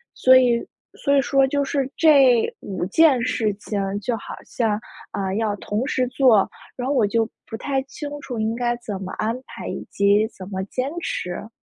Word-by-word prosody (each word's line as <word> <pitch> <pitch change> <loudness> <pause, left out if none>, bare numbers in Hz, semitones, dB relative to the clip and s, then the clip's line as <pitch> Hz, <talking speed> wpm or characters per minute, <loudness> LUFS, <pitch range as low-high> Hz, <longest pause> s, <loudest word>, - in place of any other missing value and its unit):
所 260 0 +6
以 240 -2 +2 0.3
所 280 -1 +1
以 275 - +5
说 270 +1 +3
就 285 +1 0
是 275 -1 -1
这 270 -7 +5
五 195 - -4
件 280 +1 +4
事 225 -4 0
情， 205 0 -4 0.2
就 230 +2 -2
好 - - -8
像， 220 -3 -1 0.3
啊， 190 -1 -2
要 215 -2 0
同 215 +5 -2
时 255 -3 0
做， 245 -6 +4 0.3
然 250 0 -4
后 285 - +1
我 230 -5 +4
就 225 +2 0 0.2
不 225 - -7
太 275 +2 -1
清 290 +2 -7
楚 245 -4 -5
应 220 +1 0
该 240 0 0
怎 210 -5 -6
么 185 -1 -6
安 225 +2 0
排 - - -8
以 - - -5
及 200 +2 +3
怎 190 +1 -9
么 190 -1 -3
坚 255 +7 -3
持。 205 - -4
235 Hz, 205 characters per minute, -22 LUFS, 210-265 Hz, 0.3 s, 所